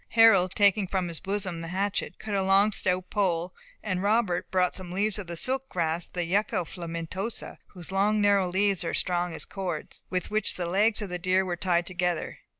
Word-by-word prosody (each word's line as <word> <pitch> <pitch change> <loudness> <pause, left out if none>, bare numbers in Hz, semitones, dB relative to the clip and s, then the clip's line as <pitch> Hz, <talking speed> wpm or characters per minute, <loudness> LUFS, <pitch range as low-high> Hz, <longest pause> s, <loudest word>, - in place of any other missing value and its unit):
Harold, 195 -5 +6
taking 200 -1 +4
from 185 -2 -1
his 165 - -3
bosom 190 -4 -3
the 165 - -6
hatchet, 195 +3 -2
cut 215 - -6
a 195 - +2
long 195 +2 +4
stout 185 -2 -1
pole, 180 -3 0 0.3
and 185 -3 -1
Robert 205 -3 +1
brought 185 -1 +2
some 185 -2 -6
leaves 205 +3 0
of 195 - -6
the 170 0 -5
silk 265 +6 0
grass 165 -1 -1
(the 175 -1 -3
yucca 185 0 0
filamentosa, 170 +6 -5
whose 180 -1 -10
long 205 +2 +2
narrow 200 -3 +3
leaves 195 0 +1
are 165 - -2
strong 175 -1 0
as - - -5
cords), 180 -6 -5
with 185 +1 -2
which 215 -1 +2
the 180 - -3
legs 210 +5 +2
of 200 - -5
the 180 0 -4
deer 185 +2 +2
were 180 -1 -2
tied 175 -1 +1
together. 180 -2 -2
185 Hz, 200 wpm, -27 LUFS, 175-205 Hz, 0.3 s, Harold